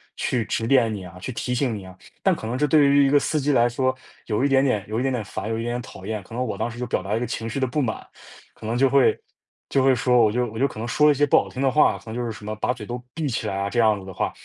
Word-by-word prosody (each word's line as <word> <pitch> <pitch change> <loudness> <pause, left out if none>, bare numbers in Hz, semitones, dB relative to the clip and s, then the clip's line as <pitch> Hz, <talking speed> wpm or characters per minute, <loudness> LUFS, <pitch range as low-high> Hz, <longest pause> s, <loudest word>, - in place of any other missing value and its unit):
去， 120 -4 -1
指 115 +1 -2
点 120 -4 +3
你 100 -3 -6
啊、 90 0 -11
去 115 +8 -5
提 115 +2 -4
醒 125 -2 0
你 100 - -7
啊。 95 0 -12 0.2
但 - - +3
可 - - -8
能 120 +3 -2
这 150 +3 +1
对 150 -1 +5
于 140 0 +5
一 - - +2
个 145 - +5
司 150 +1 0
机 145 - +1
来 120 -3 +4
说， 130 +2 0 0.3
有 110 +5 +1
一 - - +4
点 135 -1 +3
点 105 -7 0
有 110 +2 -2
一 - - -1
点 135 +1 0
点 120 -5 -2
烦、 105 +2 -5
有 115 - -1
一 115 - -3
点 120 0 -2
点 125 - -3
讨 95 - -11
厌。 110 -1 -3
可 115 +5 -12
能 125 +1 -1
我 110 - -3
当 - - -2
时 120 - -10
就 125 - -3
表 115 - -1
达 95 - -9
了 110 - +2
一 - - -1
个 125 - -1
情 115 -1 -4
绪 135 - -3
的 130 - +2
不 130 +4 -1
满。 110 -4 -3 0.5
可 - - -12
能 115 +2 -1
就 135 +1 +4
会 135 0 +3 0.5
就 135 - +2
会 135 0 +5
说 125 0 +3
我 105 - +3
就 125 +2 0
我 110 -1 -7
就 135 - +3
可 115 - -12
能 115 - -4
说 150 +5 +3
了 - - +7
一 - - +1
些 145 +2 +3
不 145 - +2
好 - - +1
听 130 - -6
的 135 - +3
话。 130 -7 +3
可 100 - -17
能 - - -6
就 120 - -2
是 115 - -3
什 105 -1 -10
么， 110 0 -4
“把 - - +1
嘴 110 -4 -9
都 120 +2 -6
闭 155 -2 -2
起 120 - -2
来 95 - -2
啊”， 100 0 -1
这 120 - 0
样 110 -3 +4
子 95 - -11
的 95 - -8
话。 - - -1
120 Hz, 385 characters per minute, -23 LUFS, 110-135 Hz, 0.5 s, 了